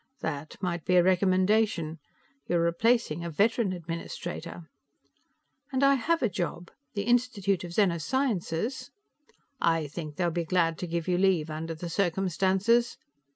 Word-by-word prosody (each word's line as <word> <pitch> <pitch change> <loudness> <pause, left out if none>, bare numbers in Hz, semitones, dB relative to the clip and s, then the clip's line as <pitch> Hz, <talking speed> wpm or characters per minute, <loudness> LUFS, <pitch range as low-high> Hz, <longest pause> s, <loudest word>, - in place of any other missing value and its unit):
"That 145 +2 -4
might 175 -2 -2
be 180 - +2
a 175 - +6
recommendation. 185 -2 +2 0.5
You're 175 - +2
replacing 170 0 +1
a 170 - -3
veteran 205 +4 +2
administrator." 170 0 -6 1.1
"And 265 0 0
I 275 0 +6
have 325 +5 +1
a - - +4
job. 175 -2 -4 0.2
The 200 - -1
Institute 230 -6 +1
of 175 -1 -7
Zeno 180 -4 +2
Sciences 240 - -1 0.4
" - - -31 0.2
"I 165 -2 +2
think 150 0 -7
they'll 175 0 0
be 170 +1 -1
glad 165 -1 +1
to 180 - -4
give 170 0 -3
you 180 -1 +1
leave, 180 -5 +2
under 160 +1 -4
the 170 +2 -6
circumstances. 195 +5 +1
180 Hz, 150 wpm, -28 LUFS, 170-210 Hz, 1.1 s, a